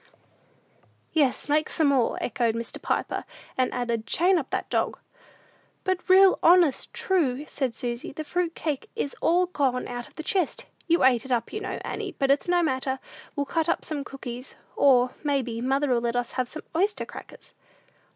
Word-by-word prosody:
"Yes, 285 -5 +2
make 305 +1 +2
some 315 - +1
more," 260 -4 +2
echoed 235 -2 0
Mr. 230 0 -5
Piper; - - -1 0.3
and 255 -1 +1
added, 235 -2 -2
"chain 360 +2 +3
up 275 - -6
that - - -2
dog." - - 0 0.9
"But 375 0 -2
real 380 0 +7
honest 340 -5 +4
true," 300 -7 +1
said 260 -5 -2
Susy, 240 0 -3
"the 310 +3 -5
fruit 340 +2 -1
cake 295 -4 -3
is 280 - -3
all 355 +2 +4
gone 275 -8 0
out 245 0 -5
of - - -22
the 315 - -6
chest. 365 -1 -1 0.2
You 335 0 +3
ate 250 -3 +5
it 265 - -8
up, 235 -2 0
you 425 - -2
know, - - -4
Annie; 405 -4 -4
but 275 0 +2
it's 280 - +2
no 350 0 +3
matter: 265 -2 0 0.4
we'll 285 - 0
cut 325 +3 0
up - - 0
some 295 -3 -3
cookies, 255 -2 -7 0.2
or, 250 -3 +5
may 285 -3 +1
be, 230 -1 -5
mother'll 265 -1 +1
let 235 0 -1
us 245 -1 -1
have 255 -1 -2
some 315 - -7
oyster 400 +5 +1
crackers." - - -12
275 Hz, 180 wpm, -26 LUFS, 250-335 Hz, 0.9 s, real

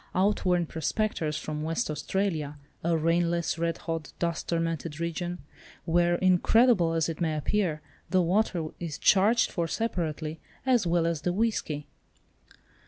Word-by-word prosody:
Outworn 185 -2 +2
prospectors 160 -1 -1
from 155 -1 -4
West 165 +9 -1
Australia—a 155 -2 -2
rainless, 170 +1 +1
red 165 0 0
hot, 165 -3 -5
dust 170 -1 -2
tormented 165 -2 -2
region, 175 +1 -3 0.5
where, 175 +1 +3
incredible 185 +1 +4
as 165 -1 +1
it 165 0 -5
may 160 -2 0
appear, 160 -1 0 0.3
the 185 -2 +3
water 175 -3 +1
is 165 -5 -4
charged 210 +4 +4
for 170 -2 -1
separately 160 -7 -2 0.3
as 245 -8 +3
well 170 0 +2
as 165 -2 -1
the 175 - 0
whisky. 180 -8 -1
170 Hz, 130 wpm, -28 LUFS, 160-185 Hz, 0.5 s, incredible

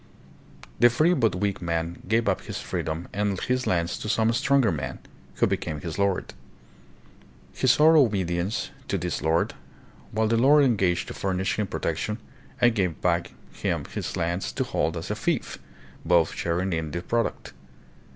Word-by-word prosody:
The 120 - +7
free 155 +9 +3
but 115 - +2
weak 100 0 -1
man 85 0 -2
gave 115 +2 +2
up 95 - +1
his - - -6
freedom 80 +2 -3
and 100 -2 0
his 125 0 -1
lands 85 -1 0
to 105 - -5
some 115 0 +2
stronger 135 -2 +3
man, 65 -5 -4 0.4
who - - +3
became 75 -1 -2
his 85 +2 -5
lord. 100 -2 0 1.2
He 130 - -1
swore 150 +6 +6
obedience 95 - +1 0.2
to - - 0
this - - -3
lord, 80 +2 +1 0.6
while 110 +1 +1
the 115 +1 +2
lord 145 +5 +6
engaged 95 -8 +1
to - - -5
furnish 95 +1 -1
him 105 - 0
protection 90 +6 -2 0.4
and 120 -1 +5
gave 90 -7 0
him - - -25
back 85 -1 +1 0.2
his - - -3
lands 85 +3 -1
to - - 0
hold 80 +1 -1
as 80 - -5
a - - -1
"fief," - - -2 0.4
both 85 -2 +3
sharing 90 +3 -1
hi 80 -1 0
the 80 +3 -5
product. 115 - -2
95 Hz, 165 wpm, -26 LUFS, 85-115 Hz, 1.2 s, The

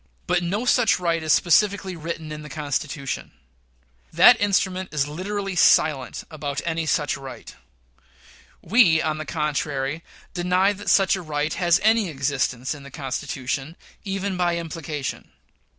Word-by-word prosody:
But 175 - +1
no 200 +7 -2
such 230 -6 +3
right 170 -2 0
is 155 -1 0
specifically 190 +2 +3
written 165 -1 -6
in 150 0 -6
the 150 - -10
Constitution. 145 -2 -4 0.8
That - - +7
instrument 190 -2 0
is 145 -2 0
literally 195 +5 -4
silent 150 -5 +3
about 145 -2 -4
any 165 -1 -2
such 150 0 +1
right. 135 -2 -10 1.1
We, 180 -5 +5
on 155 -1 -1
the 155 - -6
contrary, 150 0 -2 0.3
deny 180 +3 +2
that 205 +1 -5
such 195 0 +4
a 190 - -5
right 155 -1 -2
has 175 0 +3
any 220 -3 +3
existence 130 -3 -1
in 145 - -10
the 140 - -11
Constitution, 135 +2 -4 0.3
even 195 -1 -3
by 175 -1 +1
implication. 160 -4 -5
160 Hz, 140 wpm, -23 LUFS, 145-185 Hz, 1.1 s, That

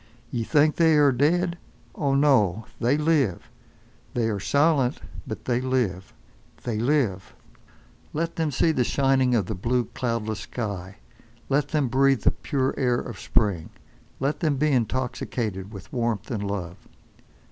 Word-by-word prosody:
Ye 120 - -1
think 150 +4 +3
they 160 -2 +5
are 145 -2 +5
dead! 170 +7 +1 0.3
Oh, 140 -4 0
no! 115 -8 +3
they 125 +5 +2
live! 150 - +1 0.6
They 115 -2 +1
are 100 - -2
silent, 140 - +2 0.3
but - - -6
they 125 -1 +1
live. 120 -8 -1 0.5
They 115 -3 -2
live! 120 -7 0 0.8
Let 165 +2 -2
them 160 -2 0
see 150 +4 +2
the 130 -5 +1
shining 130 -1 +2
of 105 -5 +1
the 110 - -4
blue, 120 +5 0
cloudless 115 -4 -2
sky, 100 -3 -5 0.5
let 140 +1 +2
them 150 -3 0
breathe 135 +1 +3
the - - +5
pure 135 -3 -1
air 125 -3 +2
of 120 -6 -7
spring, 95 -7 0 0.5
let 140 +3 -1
them 150 -4 +1
be 150 +2 +2
intoxicated 115 -5 -2
with 100 -2 -11
warmth 120 0 -1
and 105 -4 -2
love. 90 -2 -5
125 Hz, 145 wpm, -25 LUFS, 110-145 Hz, 0.8 s, they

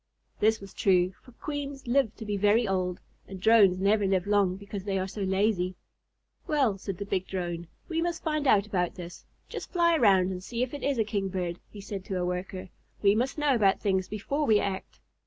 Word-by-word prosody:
This 220 +1 +3
was 195 -1 -11
true, 185 -1 +2
for 250 - -17
Queens 285 0 -5
live 240 -3 +1
to 220 - -8
be 205 -1 -2
very 210 +3 +3
old, 185 -2 -1 0.3
and 190 -1 -8
Drones 205 -3 +5
never 200 +1 +3
live 190 -1 +1
long 200 -3 +2
because 200 0 -7
they 195 -1 -1
are 190 0 -1
so 205 +2 -7
lazy. 190 -1 +1 0.7
"Well," 265 -10 +1
said 195 -2 -5
the 200 - -5
big 190 -2 -2
Drone, 175 -2 -4 0.2
"we 330 -1 -1
must 340 -1 -2
find 305 -2 0
out 205 -5 +5
about 180 -4 -1
this. 175 -1 -10 0.2
Just - - -7
fly 340 -2 +3
around 195 - +4
and 180 0 -6
see 235 +4 -2
if 255 - -4
it 290 - -5
is 280 -2 0
a 225 - +3
Kingbird," 190 -4 -3
he 205 - -10
said 195 -1 -6
to 190 - -3
a 180 - -1
Worker. 180 +1 -4 0.3
"We 200 0 +6
must 250 +7 -1
know 295 -2 +2
about 205 -5 +3
things 190 -2 0
before 275 +9 -2
we 215 -2 +5
act." 195 -2 -4
200 Hz, 210 wpm, -28 LUFS, 185-230 Hz, 0.7 s, We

